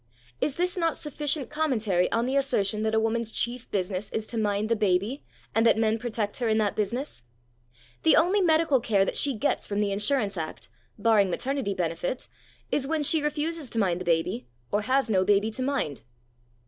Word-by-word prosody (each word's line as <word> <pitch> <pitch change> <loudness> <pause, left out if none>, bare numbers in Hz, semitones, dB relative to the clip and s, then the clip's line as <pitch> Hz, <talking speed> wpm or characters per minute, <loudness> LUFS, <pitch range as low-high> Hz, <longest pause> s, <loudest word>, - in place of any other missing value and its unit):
Is 285 - 0
this 360 +1 0
not 330 -2 0
sufficient 295 -3 -1
commentary 225 - +1
on 230 +1 +1
the 260 +2 -1
assertion 215 -7 +1
that 220 0 0
a - - +4
woman's 225 0 0
chief 240 +2 -2
business 190 0 -2
is 220 - -3
to 230 - -6
mind 205 0 0
the 230 - +2
baby 210 +5 0 0.3
and 225 - +3
that 230 - +4
men 220 0 +1
protect 215 -3 -2
her 240 -3 0
in 220 - +2
that 210 -2 +1
business? 230 - -3 0.8
The 160 - +5
only 370 +5 +4
medical 320 -5 +3
care 205 -4 +2
that - - -3
she 280 -3 +1
gets 225 +7 0
from 205 0 -2
the 205 -1 +1
Insurance 205 0 0
Act 160 -1 -6 0.3
(barring 210 -3 +3
maternity 255 +1 -2
benefit) 175 +7 -2 0.4
is 270 -2 0
when 315 0 0
she 315 +2 +4
refuses 300 0 -2
to 230 - -5
mind 180 -4 +1
the - - -5
baby 165 -7 0 0.2
or 205 - +1
has 260 +5 +1
no 190 -4 +2
baby 205 +3 +2
to 240 - -5
mind. 255 - -1
225 Hz, 195 wpm, -27 LUFS, 200-275 Hz, 0.8 s, The